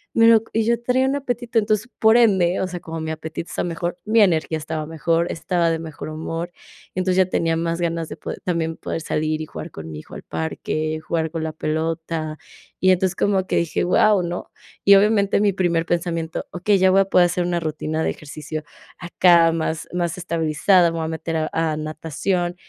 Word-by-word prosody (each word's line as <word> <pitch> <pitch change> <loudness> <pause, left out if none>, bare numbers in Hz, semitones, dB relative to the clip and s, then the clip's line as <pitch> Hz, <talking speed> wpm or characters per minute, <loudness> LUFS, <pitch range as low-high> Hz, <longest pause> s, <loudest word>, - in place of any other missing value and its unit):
me 230 0 +6
lo 225 -1 +6
co - - -22
y 225 - +2
yo 235 0 +2
traía 255 +2 +2
un 270 - 0
apetito, 245 -3 -3
entonces, 215 +2 0
por 220 0 +6
ende, 190 -6 +3
o 190 - 0
sea, 180 -1 -6
como 165 0 -6
mi 160 - -4
apetito 160 +1 -6
está - - -2
mejor, 175 +1 -3
mi 220 +1 +4
energía 160 -4 +2
estaba 155 0 -4
mejor, 165 +1 0
estaba 170 0 0
de 165 - -1
mejor 155 -1 -7
humor, 165 +2 -4 0.4
entonces 185 0 0
ya 185 -1 +4
tenía 165 -1 +1
más 170 +1 -2
ganas 165 -1 -2
de 150 - -7
poder, - - -6
también 165 -2 -2
poder 165 - -4
salir 155 0 -1
y - - -4
jugar 160 - -8
con 80 0 -8
mi 75 - -7
hijo - - -14
al - - -7
parque, 155 - -3
jugar 160 -2 -1
con 165 -1 -3
la 160 - -2
pelota, 160 0 -3 0.4
y 185 - +4
entonces 185 0 +1
como 195 -2 +1
que - - -1
dije: 170 -2 0
"Guau", 200 +2 +4
¿no?, 175 +1 -5 0.3
y 200 - +8
obviamente, 200 0 +3
mi 205 -1 +3
primer 170 -3 +1
pensamiento, 165 -1 -2
okey, 195 +3 +2
ya 190 0 +5
voy 195 - +5
a - - +2
poder 180 -2 +4
hacer 175 +1 -1
una 175 -1 0
rutina 155 0 -2
de - - +1
ejercicio, 155 +1 -7 0.4
acá 175 -1 +4
más 160 -1 -2
más 175 -1 -1
estabilizada, 170 +1 +2
me 165 - -4
voy 160 - -2
a 160 - -3
meter 160 0 -3
a 155 0 -1
a 160 -1 0
natación, 165 +4 -2
170 Hz, 210 wpm, -22 LUFS, 160-185 Hz, 0.4 s, y